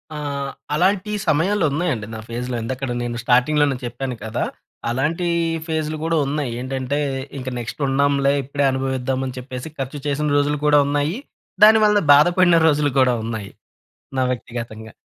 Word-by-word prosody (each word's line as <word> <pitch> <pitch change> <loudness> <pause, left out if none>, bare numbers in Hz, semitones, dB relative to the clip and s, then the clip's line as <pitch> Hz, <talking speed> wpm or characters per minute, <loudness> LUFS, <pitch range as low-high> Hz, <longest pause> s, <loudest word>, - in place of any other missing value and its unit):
ఆ! - - -4 0.6
అలాంటి 195 +5 +1 0.2
సమయాలు 180 +6 +2
ఉన్నాయండి 145 -9 -1
నా - - -6
ఫేస్‌లో. 125 +1 -3
ఇందాకడ 130 +3 -4
నేను 120 0 -3
స్టార్టింగ్‌లోనే 135 +3 +3
చెప్పాను 125 +1 -4
కదా! 110 - -2 0.5
అలాంటి 150 +8 0 0.4
ఫేస్‌లు 155 -1 -2
కూడా 165 0 +1
ఉన్నాయి. 145 -3 -2
ఏంటంటే 130 +2 -2 0.4
ఇంక 130 0 -4
నెక్స్ట్ 120 +5 -6
ఉండంలే 140 0 +2
ఇప్పుడే 140 +2 -2
అనుభవిద్దామని 130 0 -2
చెప్పేసి, 125 +2 -7
ఖర్చు 135 +2 -4
చేసిన 145 +1 0
రోజులు 145 +1 +1
కూడా 150 0 +5
ఉన్నాయి. 145 +6 0 0.5
దానివల్ల 215 -1 +6
బాధపడిన 175 +4 +5
రోజులు 145 -2 +2
కూడా 130 -1 +4
ఉన్నాయి, 110 -3 -5 0.7
నా 130 - +2
వ్యక్తిగతంగా. 115 -3 -6
140 Hz, 135 wpm, -21 LUFS, 125-155 Hz, 0.7 s, దానివల్ల